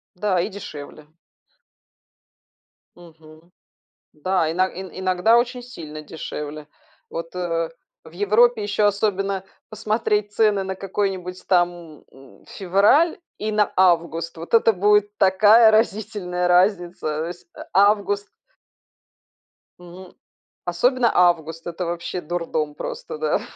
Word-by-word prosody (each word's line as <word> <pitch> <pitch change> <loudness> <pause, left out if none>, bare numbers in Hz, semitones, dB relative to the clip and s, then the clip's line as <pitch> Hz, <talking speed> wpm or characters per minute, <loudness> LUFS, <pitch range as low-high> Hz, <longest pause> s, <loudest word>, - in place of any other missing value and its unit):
Да, 185 -1 0
и 180 - -1
дешевле. 155 -6 -10 1.9
Мгм. 160 0 -17 0.6
Да, 170 0 0
ино 185 +3 +1
иногда 185 +3 +1
очень 245 +1 -2
сильно 155 -11 -9
дешевле. 150 -1 -7 0.4
Вот, 165 +1 -6
э, - - -5
рэ 165 -2 -2 0.3
в 160 - -14
Европе 215 +4 +3
ещё 205 0 +1
особенно 195 -1 -1 0.3
посмотреть 215 -1 -1
цены 210 -2 +2
на 190 0 -4
какой-нибудь 190 -2 -4
там, 175 -4 -1
м, 135 -1 -18
февраль 205 - +2 0.2
и 215 0 -3
на 210 -1 +2
август. 170 -3 +1
Вот 165 +7 -6
это 225 0 +5
будет 205 +1 +2
такая 215 +4 +6
разительная 205 -5 0
разница. 175 -4 +1
Всь 175 0 -20
а - - -9 0.3
август 205 -1 -2 1.5
М. 180 +1 -13 0.5
Особенно 240 +7 +2
август- 165 -2 +1
это 175 +1 -4
вообще 175 +1 -4
дурдом 155 -3 -3
просто, - - -6
да. 470 - 0
185 Hz, 110 wpm, -22 LUFS, 170-210 Hz, 1.9 s, такая